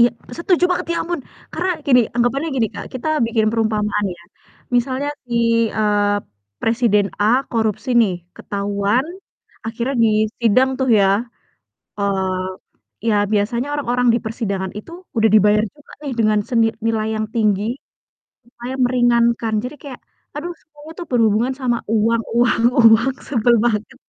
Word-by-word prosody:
Iya, 240 Hz, -, +7 dB, 0.3 s
setuju 355 Hz, 0 st, +2 dB
banget, 360 Hz, -, -1 dB
ya -, -, -2 dB
ampun! 345 Hz, -2 st, -3 dB, 0.3 s
Karena 365 Hz, +3 st, -1 dB, 0.2 s
gini, 250 Hz, -3 st, +6 dB
anggapannya 245 Hz, +6 st, 0 dB
gini, 230 Hz, -3 st, +2 dB
Kak, -, -, -7 dB
kita 255 Hz, +4 st, -3 dB, 0.2 s
bikin 225 Hz, -1 st, +1 dB
perumpamaan 210 Hz, -2 st, 0 dB
ya, 170 Hz, -, -18 dB, 0.5 s
misalnya 260 Hz, +4 st, 0 dB, 0.2 s
si, 240 Hz, -, -7 dB, 0.4 s
eee, 205 Hz, -1 st, +2 dB, 0.5 s
presiden 225 Hz, -3 st, +2 dB, 0.2 s
A -, -, +3 dB, 0.3 s
korupsi 220 Hz, +2 st, -1 dB
nih, 200 Hz, -5 st, +1 dB, 0.2 s
ketahuan 200 Hz, +5 st, -1 dB, 0.6 s
akhirnya 235 Hz, +4 st, -3 dB
disidang 220 Hz, +3 st, +2 dB
tuh 260 Hz, -1 st, 0 dB
ya, 195 Hz, -1 st, +4 dB, 0.9 s
eee, 190 Hz, -2 st, -1 dB, 0.6 s
ya 220 Hz, -, +3 dB, 0.2 s
biasanya 235 Hz, +5 st, 0 dB
orang-orang 250 Hz, -3 st, 0 dB
di -, -, +2 dB
persidangan 200 Hz, -4 st, -3 dB
itu 215 Hz, -, -11 dB, 0.2 s
udah 225 Hz, 0 st, +4 dB
dibayar 210 Hz, 0 st, +4 dB
juga 295 Hz, -1 st, -19 dB
nih, 280 Hz, -, -4 dB
dengan 215 Hz, -1 st, +3 dB
seni 230 Hz, -2 st, +3 dB, 0.2 s
nilai 220 Hz, -1 st, 0 dB
yang 215 Hz, 0 st, -2 dB
tinggi, 210 Hz, -3 st, +1 dB, 0.8 s
supaya 240 Hz, +1 st, -8 dB
meringankan, 235 Hz, -2 st, +2 dB
jadi 255 Hz, +4 st, -6 dB
kayak, 270 Hz, -4 st, -9 dB, 0.4 s
aduh, 345 Hz, +4 st, -4 dB
semuanya 300 Hz, 0 st, -14 dB
tuh 345 Hz, -, -6 dB
berhubungan 230 Hz, +1 st, +2 dB
sama 245 Hz, -2 st, +1 dB, 0.2 s
uang 230 Hz, +1 st, +2 dB
uang 240 Hz, -1 st, +3 dB, 0.3 s
uang, 240 Hz, +4 st, +3 dB
sebel 235 Hz, -2 st, +3 dB
banget. 215 Hz, -3 st, -1 dB
230 Hz, 140 wpm, -19 LUFS, 210-255 Hz, 0.9 s, Iya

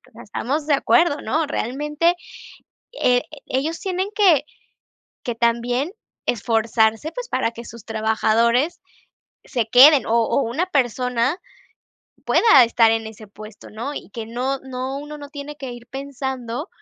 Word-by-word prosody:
O -, -, -26 dB
sea, 235 Hz, +2 st, -12 dB
estamos 285 Hz, +8 st, -3 dB
de 295 Hz, -, +3 dB
acuerdo, 300 Hz, +1 st, +3 dB
¿no? 315 Hz, -1 st, 0 dB
Realmente, 295 Hz, +6 st, 0 dB, 0.9 s
eh, 245 Hz, 0 st, +4 dB, 0.2 s
ellos 295 Hz, +6 st, -2 dB
tienen 375 Hz, +1 st, -2 dB
que, 350 Hz, -10 st, +4 dB, 0.8 s
que 240 Hz, -3 st, -2 dB
también 240 Hz, +6 st, 0 dB, 0.3 s
esforzarse, 225 Hz, +3 st, +1 dB
pues, -, -, -6 dB
para -, -, 0 dB
que 235 Hz, -, -10 dB
sus 230 Hz, -1 st, -11 dB
trabajadores 230 Hz, +7 st, +1 dB, 0.7 s
se 240 Hz, -5 st, -1 dB
queden, 265 Hz, +3 st, +7 dB
o 225 Hz, -, -1 dB
o 280 Hz, -, +1 dB
una 270 Hz, +11 st, -1 dB
persona, 250 Hz, -, 0 dB, 0.9 s
pueda 280 Hz, -, +6 dB
estar 230 Hz, -1 st, +4 dB
en 225 Hz, -1 st, -1 dB
ese 220 Hz, 0 st, -11 dB
puesto, 215 Hz, +1 st, -12 dB
¿no? 235 Hz, +7 st, -5 dB
Y -, -, -8 dB
que 225 Hz, 0 st, -6 dB
no 255 Hz, +4 st, -2 dB
no 260 Hz, +1 st, -5 dB
uno 295 Hz, +1 st, -8 dB
no 285 Hz, -1 st, -9 dB
tiene 295 Hz, 0 st, -8 dB
que 265 Hz, -4 st, -7 dB
ir 240 Hz, 0 st, -11 dB
pensando 265 Hz, -, -5 dB
255 Hz, 145 wpm, -21 LUFS, 230-295 Hz, 0.9 s, queden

